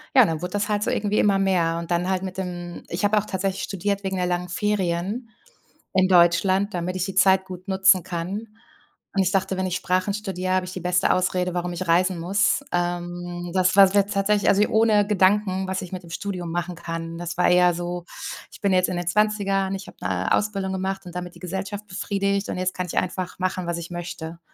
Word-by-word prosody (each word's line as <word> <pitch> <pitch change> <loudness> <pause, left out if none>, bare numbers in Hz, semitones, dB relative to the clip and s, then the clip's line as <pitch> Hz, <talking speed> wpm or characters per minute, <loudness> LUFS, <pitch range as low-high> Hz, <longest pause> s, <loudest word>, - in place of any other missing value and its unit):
ja, 255 - +8
dann 160 -1 -2
wurde 180 - -3
das 205 +1 -1
halt 210 0 +1
so - - 0
irgendwie 205 0 0
immer 200 -2 +3
mehr 175 -4 +2
und 170 0 -7
dann 175 +1 +1
halt 190 -1 0
mit 190 0 -5
dem 175 -2 -5
ich 170 +4 -4
habe 215 +1 +3
auch 210 - +1
tatsächlich 190 -1 -2
studiert 200 +1 -2
wegen 190 0 -2
der 180 -1 0
langen 180 0 -1
Ferien 205 +3 -1 0.6
in 185 0 +4
Deutschland, 185 +3 +4
damit 175 +1 -2
ich 185 0 -1
die 195 -1 -6
Zeit 190 0 +5
gut 185 0 -9
nutzen 190 -2 +4
kann. 185 +6 -4 0.7
Und 195 - +3
ich 185 - 0
dachte, 190 -1 0
wenn 185 - 0
ich 185 - -1
Sprachen 185 +2 0
studiere, 185 -3 -2
habe 185 -1 +1
ich 185 - -7
die 185 - -6
beste 180 0 +2
Ausrede, 180 0 0
warum 175 0 -2
ich 175 +1 -4
reisen 180 +1 +2
muss. 195 +10 +1
Ähm, 175 0 -3
das 185 0 +3
war's 195 -1 +7
wäre 200 - +6
jetzt 205 - -5
tatsächlich 200 +1 +2
also 200 - +4
hier 210 - +3
ohne 215 -2 +4
Gedanken, 190 -1 +2
was 190 0 -2
ich 180 - -8
mit 185 -1 -6
dem 170 - -13
Studium 180 -2 -4
machen 175 +1 -3
kann. 165 0 -5
Das 175 +1 -5
war 180 - +4
eher 180 0 +5
so: 175 0 -4 0.5
Ich - - -14
bin 200 -3 +2
jetzt 185 0 +3
in 180 - -2
den 175 -1 -4
20ern, 195 0 +1
ich 190 0 -8
habe - - -13
'ne 90 +1 -1
Ausbildung 195 -2 0
gemacht 190 0 -3
und 175 - -10
damit 180 -1 -5
die - - -14
Gesellschaft 195 +3 -5
befriedigt 200 +1 -1
und - - -3
jetzt 185 0 -1
kann 180 - -2
ich - - -5
einfach 185 0 -4
machen, 185 -1 -1
was 170 0 -2
ich 170 - -7
möchte. 170 -1 -6
185 Hz, 230 wpm, -24 LUFS, 175-195 Hz, 0.7 s, ja